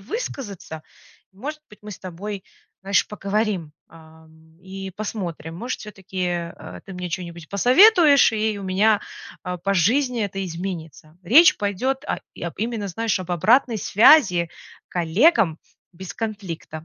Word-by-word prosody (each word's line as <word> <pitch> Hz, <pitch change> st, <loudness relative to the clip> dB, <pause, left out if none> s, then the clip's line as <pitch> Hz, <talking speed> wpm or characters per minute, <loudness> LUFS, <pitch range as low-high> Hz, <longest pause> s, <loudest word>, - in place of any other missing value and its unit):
высказаться, 200 Hz, -, -6 dB, 0.5 s
может 300 Hz, +10 st, -7 dB
быть, 210 Hz, -, -16 dB
мы 210 Hz, -, -9 dB
с -, -, -8 dB
тобой, 190 Hz, +2 st, -7 dB, 0.4 s
знаешь, 195 Hz, 0 st, +2 dB
поговорим, 200 Hz, -6 st, -2 dB, 0.2 s
а, 160 Hz, 0 st, -17 dB
м, 160 Hz, 0 st, -23 dB
и 190 Hz, 0 st, -8 dB
посмотрим. 175 Hz, -6 st, -6 dB
Может, 240 Hz, +7 st, -4 dB
всё-таки, 195 Hz, -3 st, -10 dB
э, 170 Hz, -1 st, -6 dB
ты 195 Hz, -, -10 dB
мне 180 Hz, 0 st, -5 dB
чё-нибудь 170 Hz, -2 st, -6 dB
посоветуешь, 285 Hz, -, +6 dB
и 215 Hz, -1 st, -1 dB
у -, -, -8 dB
меня, 200 Hz, +3 st, +2 dB, 0.4 s
а, 180 Hz, 0 st, -4 dB
по 195 Hz, +3 st, -1 dB
жизни 240 Hz, -, +2 dB
это 195 Hz, -1 st, -4 dB
изменится. 165 Hz, -3 st, -7 dB
Речь 290 Hz, -, +6 dB
пойдёт 255 Hz, +8 st, -2 dB
о -, -, -3 dB, 0.2 s
об 170 Hz, -1 st, -5 dB
именно, 225 Hz, -2 st, -2 dB
знаешь, 225 Hz, +2 st, -1 dB
об 180 Hz, -1 st, -7 dB
обратной 230 Hz, -, +3 dB
связи 195 Hz, -, +5 dB, 0.4 s
коллегам 175 Hz, -, +2 dB, 0.3 s
без 185 Hz, +1 st, -9 dB
конфликта. 190 Hz, -8 st, -6 dB
195 Hz, 140 wpm, -22 LUFS, 170-220 Hz, 0.5 s, посоветуешь